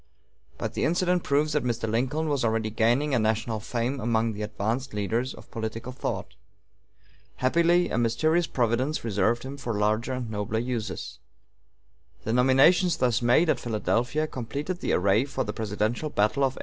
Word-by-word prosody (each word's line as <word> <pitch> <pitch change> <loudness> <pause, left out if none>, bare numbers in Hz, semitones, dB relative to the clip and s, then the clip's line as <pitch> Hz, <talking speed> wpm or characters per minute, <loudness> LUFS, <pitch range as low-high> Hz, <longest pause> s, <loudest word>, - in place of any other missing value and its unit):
But - - -4
the - - -2
incident 180 +2 +2
proves 150 +2 +1
that 150 - +1
Mr. 115 -2 -1
Lincoln 130 +8 0
was 140 -4 0
already 110 -1 0
gaining 120 +7 +2
a 125 - +3
national 110 0 0
fame 120 +5 -2
among 115 -1 0
the 105 - -6
advanced 110 +4 -3
leaders 115 +6 -1
of - - -15
political 115 +2 -5
thought. 130 - -4 1.0
Happily, 170 +6 +2
a 115 - +1
mysterious 155 +9 +2
Providence 125 +5 0
reserved 115 +2 +1
him 135 +2 -7
for 120 -5 -3
larger 110 +4 +1
and 125 -3 -4
nobler 105 +1 -2
uses. 115 -2 -4 1.0
The 110 - -1
nominations 135 +9 +4
thus 125 -2 +1
made 120 +8 +4
at - - +2
Philadelphia 120 +6 0
completed 145 +7 -4
the - - -1
array 100 +5 +3
for 135 - -2
the 105 - -4
presidential 110 +7 -2
battle 105 +3 +1
of 130 - -1
1856. - - -11
120 Hz, 165 wpm, -26 LUFS, 110-140 Hz, 1.0 s, nominations